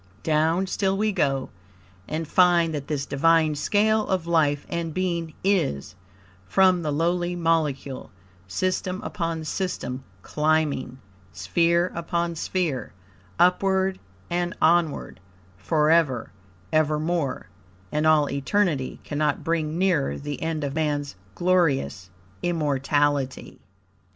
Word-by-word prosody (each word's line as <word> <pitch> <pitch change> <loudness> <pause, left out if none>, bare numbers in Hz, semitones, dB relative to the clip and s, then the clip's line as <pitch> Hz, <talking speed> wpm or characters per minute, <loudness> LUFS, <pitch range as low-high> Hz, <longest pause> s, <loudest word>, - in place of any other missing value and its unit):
Down 160 +4 +2
still 190 0 0
we 215 +1 +1
go, 135 -8 0 0.6
and 160 +1 -3
find 175 -2 +4
that 145 -2 -4
this 145 -2 -2
Divine 160 +2 +3
scale 215 +8 +1
of 185 -3 -1
life 155 -4 +1
and 170 -2 -4
being 170 -3 -2
is, 160 - 0 0.5
from 185 - +4
the 155 -2 -2
lowly 175 +3 0
molecule, 155 -6 -1 0.4
system 185 - -1
upon 165 -4 -3
system 155 -7 -3 0.2
climbing, 150 -4 0 0.3
sphere 170 - +1
upon 170 0 -2
sphere, 165 -5 -2 0.4
upward 190 +1 +2 0.3
and 175 +1 -2
onward, 165 -2 +1 0.4
forever, 150 - +2 0.4
evermore, 155 -1 0 0.4
and 150 +1 +1
all 155 -2 +4
eternity 140 0 0
cannot 150 0 -1
bring 160 -1 -1
nearer 180 -7 +1
the 145 0 -6
end 160 -2 -2
of 140 -1 -2
Man's 145 -5 -1 0.2
glorious 145 - +1 0.3
immortality. 145 -4 0
160 Hz, 105 wpm, -25 LUFS, 145-175 Hz, 0.6 s, find